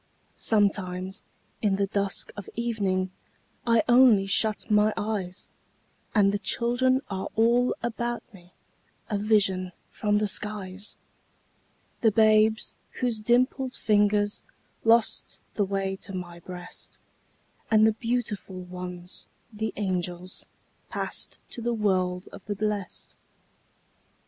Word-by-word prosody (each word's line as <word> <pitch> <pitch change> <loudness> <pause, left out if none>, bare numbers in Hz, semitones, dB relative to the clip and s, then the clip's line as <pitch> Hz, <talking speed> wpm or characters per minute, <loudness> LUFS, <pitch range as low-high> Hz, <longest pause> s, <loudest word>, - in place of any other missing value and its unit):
Sometimes, 190 -3 0 0.4
in 205 -3 +2
the 200 0 +1
dusk 200 0 -1
of 205 - -8
evening, 200 -6 0 0.6
I 230 -1 +5
only 240 -5 +6
shut 215 +2 +1
my 210 +1 +5
eyes, 200 -4 -3 0.7
And 200 -2 +5
the 205 - -1
children 245 +5 +2
are 190 0 -2
all 235 +3 +3
about 235 0 -2
me, 180 -2 -16 0.6
A 205 - +1
vision 195 -4 +2 0.2
from 210 -1 +1
the 210 - +2
skies: 200 -1 -4 1.0
The 225 - +6
babes 215 +1 +4 0.2
whose 240 -3 -1
dimpled 250 +3 +2
fingers 205 -1 +2 0.4
Lost 225 0 +3
the 205 - +1
way 195 0 -1
to 195 0 -7
my 175 -2 -6
breast, 180 0 -9 0.7
And 220 -1 +6
the 220 - +4
beautiful 230 -5 -3
ones, 180 0 -7 0.3
the 220 0 -2
angels, 180 -2 -3 0.4
Passed - - -2
to 235 - -3
the 235 0 0
world 185 -3 0
of 200 - -11
the 205 - -2
blest. 205 -1 -3
205 Hz, 115 wpm, -27 LUFS, 190-220 Hz, 1.0 s, only